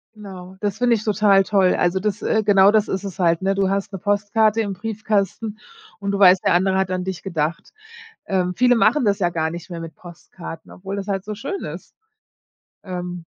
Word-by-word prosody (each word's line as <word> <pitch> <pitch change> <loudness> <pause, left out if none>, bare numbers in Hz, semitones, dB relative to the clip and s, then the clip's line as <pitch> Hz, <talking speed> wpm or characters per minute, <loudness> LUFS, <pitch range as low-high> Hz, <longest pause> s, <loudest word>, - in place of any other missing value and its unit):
Genau, 190 -3 -10
das 205 0 -2
finde 245 -1 +3
ich 215 - -4
total 205 -2 +4
toll. 190 -2 +2
Also, 175 +2 +1
das 205 0 -2
äh, 220 -1 +1
genau 200 -1 +5
das 215 -1 +2
ist 190 +1 -3
es 195 -1 -7
halt, 170 0 +2
ne? 195 +1 +1
Du 195 -1 +1
hast 200 +1 -2
'ne 195 - -5
Postkarte 205 +3 +1
im 200 -3 -3
Briefkasten 215 0 -2 0.4
und 200 -1 -2
du 200 - -2
weißt, 185 -1 +6
der - - +4
andere 190 +2 +2
hat 190 -1 0
an 185 0 -2
dich 190 -1 -5
gedacht. 165 -3 -3 0.6
Ähm, 180 -2 0
viele 245 +2 +4
machen 225 +6 +3
das 200 -1 +2
ja 175 - +2
gar 160 -1 -1
nicht 175 +2 -8
mehr 170 - -6
mit 165 -2 -8
Postkarten, 170 -1 -11
obwohl 195 +2 -7
das 200 0 -5
halt 195 -1 -2
so 210 0 -5
schön 275 - -5
ist. - - -9 0.9
Ähm 180 -2 -6
195 Hz, 210 wpm, -21 LUFS, 180-210 Hz, 0.9 s, weißt